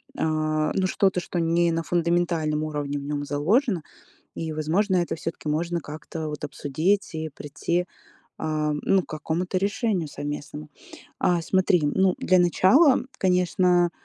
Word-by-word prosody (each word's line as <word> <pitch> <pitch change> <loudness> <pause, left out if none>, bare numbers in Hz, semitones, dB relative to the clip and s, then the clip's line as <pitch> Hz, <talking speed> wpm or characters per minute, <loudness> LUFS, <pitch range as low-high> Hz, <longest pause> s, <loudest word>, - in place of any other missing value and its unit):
а, 155 -1 0
ну, 190 - +1
что-то, 190 -1 +2
что 175 0 -4
не 170 +1 +2
на 165 0 0
фундаментальном 170 -3 0
уровне 145 -2 -3
в - - -8
нём 145 0 -3
заложено. 175 - +1 0.5
И, 160 -1 -4
возможно, 175 +6 +1
это 175 -1 0
всё-таки, 165 -1 -5
можно 170 +3 -1
как-то, 155 +1 -6
вот 150 0 -5
обсудить 160 +8 -1
и 160 0 -3
придти, 155 +4 -2 0.5
а, 155 -1 -1
ну, 195 -1 +3
к - - -17
какому-то 165 +4 -3
решению 200 -3 0
совместному. 145 +1 -6 0.5
А 175 -1 +2
смотри, 185 -1 +2
ну, 185 +5 +2
для 185 - +3
начала, 195 - +5 0.2
конечно, 180 -1 +3
165 Hz, 140 wpm, -25 LUFS, 155-180 Hz, 0.5 s, начала